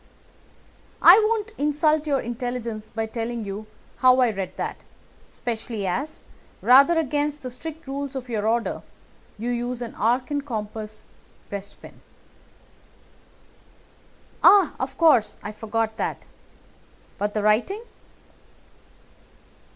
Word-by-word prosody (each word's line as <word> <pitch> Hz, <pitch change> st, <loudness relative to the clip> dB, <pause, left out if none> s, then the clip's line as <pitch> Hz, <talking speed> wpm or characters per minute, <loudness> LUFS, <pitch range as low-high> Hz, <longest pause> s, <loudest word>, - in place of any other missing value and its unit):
"I 360 Hz, +5 st, +10 dB
won't 440 Hz, 0 st, 0 dB
insult 300 Hz, +1 st, +2 dB
your 275 Hz, -3 st, +1 dB
intelligence 235 Hz, -2 st, -4 dB
by 225 Hz, 0 st, -3 dB
telling 230 Hz, 0 st, -4 dB
you 200 Hz, +2 st, -6 dB, 0.3 s
how 255 Hz, 0 st, +5 dB
I 250 Hz, -3 st, +4 dB
read 195 Hz, -2 st, -5 dB
that, -, -, -3 dB, 0.5 s
especially 225 Hz, -3 st, -4 dB
as, 255 Hz, -, -3 dB, 0.4 s
rather 275 Hz, +7 st, +6 dB
against 295 Hz, -1 st, -1 dB
the 255 Hz, -, -5 dB
strict 320 Hz, +5 st, -8 dB
rules 275 Hz, 0 st, -4 dB
of 255 Hz, -2 st, -5 dB
your 220 Hz, -3 st, -1 dB
order, 230 Hz, +1 st, 0 dB, 0.6 s
you 235 Hz, +3 st, -2 dB
use 245 Hz, 0 st, -2 dB
an 240 Hz, -2 st, -6 dB
arc 245 Hz, +5 st, 0 dB
and 285 Hz, -1 st, -1 dB
compass 215 Hz, -4 st, -6 dB, 0.5 s
breastpin." 200 Hz, 0 st, -9 dB, 2.4 s
"Ah, 395 Hz, -6 st, +7 dB
of 265 Hz, 0 st, -4 dB
course, 295 Hz, -10 st, +4 dB
I 210 Hz, -, -5 dB
forgot 220 Hz, +1 st, -2 dB
that. -, -, -3 dB, 0.9 s
But 205 Hz, +1 st, -2 dB
the 210 Hz, -, 0 dB
writing?" 240 Hz, -, +2 dB
245 Hz, 115 wpm, -24 LUFS, 220-290 Hz, 2.4 s, I